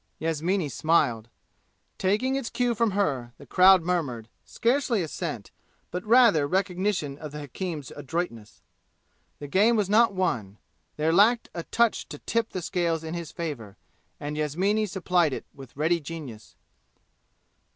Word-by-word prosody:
Yasmini 165 +2 -1
smiled. 135 -7 +1 0.7
Taking 215 +8 +1
its 270 -4 -2
cue 245 -1 0
from 230 0 +1
her, 130 -11 -1
the - - -13
crowd 185 -1 +6
murmured, 140 -11 -2
scarcely 235 -3 0
assent, 150 - -5 0.4
but 180 +1 -4
rather 220 - +5
recognition 185 -4 -1
of 155 -2 -7
the 150 0 -7
hakim's 150 0 -5
adroitness. 130 - -5 0.8
The 145 - -8
game 205 +10 +4
was 205 -3 0
not 225 -1 +4
won; 110 - -1 0.4
there 155 +2 +1
lacked 220 +6 +4
a 170 - -4
touch 235 +6 0
to - - -7
tip 230 -1 -1
the 185 - -5
scales 170 -3 -1
in 160 0 -5
his 170 -3 -5
favor, 135 - -6 0.4
and 145 +1 -4
Yasmini 185 +9 0
supplied 180 -5 +1
it - - -5
with 135 -2 -13
ready 165 +3 +2
genius. 145 -9 -9
170 Hz, 140 wpm, -26 LUFS, 145-200 Hz, 0.8 s, crowd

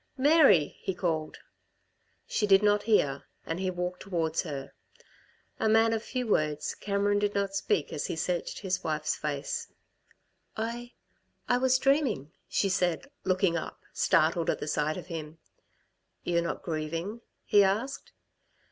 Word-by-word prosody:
"Mary!" 275 - +5
he 190 - -3
called. 160 -4 -2 0.9
She 210 - 0
did 195 0 +6
not 205 0 +4
hear, 140 -10 +2 0.2
and 165 +2 -3
he 190 -1 0
walked 180 0 -3
towards 165 -4 -1
her. 140 -6 -6 0.9
A 220 - +2
man 225 +1 +4
of 225 - -1
few 250 +2 -3
words, 150 -7 0
Cameron 205 0 0
did 205 0 0
not 200 -1 0
speak 195 -4 0
as 145 - -2
he - - -3
searched 175 +1 -2
his 190 -2 -2
wife's 155 -1 -1
face. 145 -2 -3 0.9
"I 235 +2 -4 0.5
I 245 - +3
was 260 0 +4
dreaming," 260 - +1 0.2
she 200 - +1
said, 185 - 0
looking 185 -2 +2
up, 170 - -4
startled 165 +2 +2
at - - +1
the - - -6
sight 150 0 0
of - - -7
him. 160 -2 -7 0.9
"You're 170 -1 +1
not 170 - -4
grieving?" 165 +7 -3 0.2
he 205 -1 +6
asked. 215 +8 -1
185 Hz, 145 wpm, -29 LUFS, 160-215 Hz, 0.9 s, did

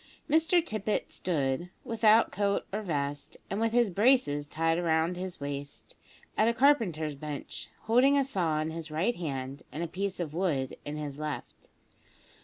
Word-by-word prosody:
Mr 325 +2 +3
Tippet 215 - -2
stood, 150 -1 -1
without 225 0 +4
coat 200 -1 0
or 210 - -1
vest, 145 -6 -3
and 195 - -1
with 225 0 +2
his 235 -3 +3
braces 195 - +3
tied 165 +3 0
round 165 +1 +2
his 185 0 -5
waist, 140 0 -5 0.4
at 215 - +3
a 235 - +2
carpenter's 215 - +3
bench, 145 0 -6
holding 250 +5 +4
a 280 - +4
saw 175 - 0
in 155 +1 -2
his 160 -1 -6
right 170 +10 +1
hand, 135 -4 -4
and 160 - -3
a - - -2
piece 195 +3 -3
of 160 -4 -3
wood 155 -7 0
in 150 +1 -4
his 145 -1 -5
left. 155 -1 -6
170 Hz, 165 wpm, -30 LUFS, 150-220 Hz, 0.4 s, without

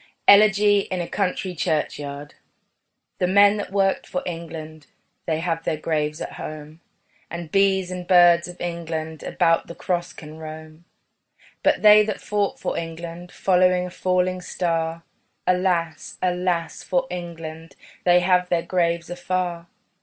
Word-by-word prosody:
ELEGY 205 0 +6
IN 185 - -2
A 175 - -3
COUNTRY 190 -1 -2
CHURCHYARD 150 -3 -3 0.9
The 180 - +2
men 200 +2 +5
that 205 - -5
worked 195 -1 +1
for 180 - -3
England 160 -3 -7 0.4
They 160 -1 0
have 165 -1 -2
their 155 - -1
graves 150 0 -2
at - - -5
home: 155 +1 -8 0.5
And 170 -2 -7
bees 190 -2 +2
and 180 -1 -6
birds 175 -2 +6
of 180 0 -10
England 160 -2 -4
About 165 -2 +1
the 170 - -9
cross 175 -1 -2
can 155 0 -11
roam. 155 +1 -10 0.8
But - - +2
they 210 0 +9
that 215 -1 -3
fought 205 -1 -1
for - - -2
England, 170 +1 -7
Following 180 -1 +2
a 180 - -7
falling 185 0 0
star, 165 -2 -2 0.4
Alas, 180 -3 0
alas 180 -2 -1
for 265 -1 0
England 165 -2 -7 0.3
They 180 0 +5
have 180 0 +2
their 170 -1 +1
graves 170 -2 0
afar. 175 -1 -3
175 Hz, 140 wpm, -23 LUFS, 165-185 Hz, 0.9 s, they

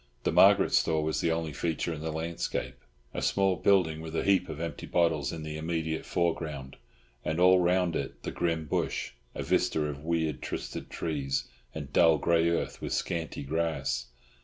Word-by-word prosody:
The - - +1
Margaret - - +6
store 80 -1 +3
was 80 0 0
the 85 - +1
only 80 -2 -2
feature 85 +1 -1
in 75 - -7
the 80 0 -3
landscape—a 80 -6 -5
small 95 -1 +2
building 80 -3 +3
with 80 0 -6
a - - 0
heap 95 -2 +3
of 75 - -6
empty 85 0 -5
bottles 80 -5 +1
in 80 -1 -6
the 75 0 -5
immediate 80 0 -2
foreground, 80 -6 -2 0.5
and 80 +2 -1
all 90 +1 +6
round 90 -1 +2
it 70 - -4
the - - -3
grim 80 -2 -1
bush, 75 - -1 0.2
a - - -3
vista - - +1
of 75 -1 -4
weird 80 -3 -1
twisted - - -5
trees 70 -4 -2 0.3
and 70 -3 -6
dull 80 -1 +6
grey 85 +2 +3
earth 85 - -2
with - - -3
scanty 80 -3 -2
grass. 70 -4 -1
80 Hz, 175 wpm, -29 LUFS, 75-85 Hz, 0.5 s, Margaret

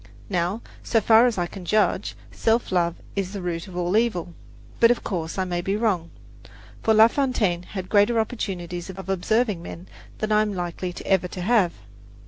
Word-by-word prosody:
Now, 180 +4 -1 0.2
so 225 - +2
far 225 +3 +6
as 235 -4 -1
I 175 - +1
can 185 +1 -9
judge, 215 +5 +1 0.2
self 225 -1 +1
love 170 -2 +1 0.2
is 195 -1 -2
the 200 - -4
root 170 0 -3
of 180 -2 -9
all 180 +2 0
evil; 215 -7 +1 0.5
but, 230 - +7
of 245 - +1
course, 165 -4 -3
I 190 - 0
may 175 -1 -2
be 195 +3 -1
wrong, 200 -7 0 0.7
for 220 - +3
La 220 +1 +8
Fontaine 230 -10 0
had 185 0 -7
greater 210 +3 +3
opportunities 180 -6 -3
of 190 0 -8
observing 205 +1 +1
men 170 +1 -9 0.3
than 215 0 -2
I 210 0 +5
am 210 -2 -1
likely 180 0 -4
ever 190 -2 +2
to 180 - -7
have. 200 -3 +3
190 Hz, 185 wpm, -24 LUFS, 175-220 Hz, 0.7 s, La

